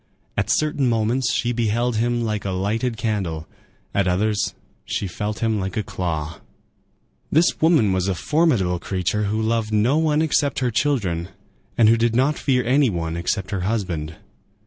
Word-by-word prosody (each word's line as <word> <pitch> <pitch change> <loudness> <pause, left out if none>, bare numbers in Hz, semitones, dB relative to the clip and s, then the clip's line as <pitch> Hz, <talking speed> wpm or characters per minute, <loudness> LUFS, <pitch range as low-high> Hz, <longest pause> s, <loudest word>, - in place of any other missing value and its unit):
At 100 +1 -1
certain 145 0 +1
moments 115 +2 +1
she 120 +1 0
beheld 120 0 0
him 120 +1 0
like 105 -2 -2
a 100 - -3
lighted 110 +6 -1
candle; 95 -8 -2 0.5
at 100 -1 +1
others 105 +3 0 0.3
she - - -3
felt 105 +4 -4
him 110 -2 +1
like 95 -1 -4
a 110 - 0
claw. 85 -4 -4 0.9
This 165 +3 +3
woman 155 - +4
was 95 0 0
a 95 - 0
formidable 115 - +1
creature 95 +3 -1
who 105 +2 -1
loved 110 0 0
no 115 +8 +3
one 155 -1 +2
except 145 -2 +1
her 125 -2 0
children, 100 - 0 0.5
and 115 - +6
who 115 +1 +5
did 115 0 +1
not 135 +4 +2
fear 125 -3 +1
any 135 +2 +3
one 85 -4 -3
except 90 +3 -2
her 95 -3 -2
husband. 90 -6 -2
110 Hz, 170 wpm, -22 LUFS, 95-125 Hz, 0.9 s, and